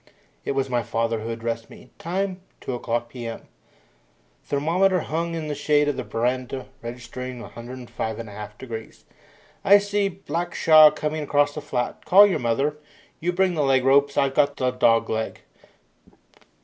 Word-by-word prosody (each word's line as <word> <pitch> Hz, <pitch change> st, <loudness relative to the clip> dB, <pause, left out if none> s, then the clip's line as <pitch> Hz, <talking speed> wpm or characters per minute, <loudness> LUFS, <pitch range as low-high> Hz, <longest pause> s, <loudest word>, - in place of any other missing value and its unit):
It -, -, -1 dB
was 135 Hz, -1 st, 0 dB
my 120 Hz, -2 st, 0 dB
father 115 Hz, 0 st, -1 dB
who 110 Hz, +1 st, -5 dB
addressed 115 Hz, 0 st, -4 dB
me. 125 Hz, -, -15 dB
Time, 185 Hz, +2 st, -2 dB, 0.2 s
2 130 Hz, -, -4 dB
o'clock 120 Hz, -1 st, -2 dB
p.m. 120 Hz, -2 st, -7 dB, 1.0 s
Thermometer 175 Hz, +6 st, +1 dB
hung 165 Hz, +2 st, -2 dB
in 160 Hz, -2 st, -4 dB
the 150 Hz, -, -2 dB
shade 150 Hz, 0 st, +2 dB
of 145 Hz, -, 0 dB
the 130 Hz, -, -4 dB
veranda 125 Hz, +3 st, -2 dB, 0.2 s
registering 125 Hz, +1 st, -7 dB
105 120 Hz, -1 st, -6 dB
1/2 105 Hz, -2 st, -8 dB
degrees. 115 Hz, -4 st, -8 dB, 0.6 s
"I 200 Hz, +1 st, +8 dB
see 205 Hz, 0 st, 0 dB
Blackshaw 165 Hz, -4 st, +4 dB
coming 155 Hz, +1 st, -2 dB
across 145 Hz, 0 st, +2 dB
the 150 Hz, -, -5 dB
flat. 125 Hz, -4 st, -3 dB
Call 200 Hz, +3 st, +8 dB
your 200 Hz, -, +1 dB
mother. 135 Hz, +6 st, 0 dB, 0.4 s
You 175 Hz, +2 st, 0 dB
bring 185 Hz, 0 st, +2 dB
the 155 Hz, -, 0 dB
leg 135 Hz, -2 st, +3 dB
ropes 140 Hz, +1 st, +4 dB
I've 140 Hz, -1 st, +2 dB
got 145 Hz, 0 st, +2 dB
the 130 Hz, -1 st, +1 dB
dog 115 Hz, -2 st, +3 dB
leg. 110 Hz, 0 st, -3 dB
135 Hz, 155 wpm, -24 LUFS, 120-155 Hz, 1.0 s, I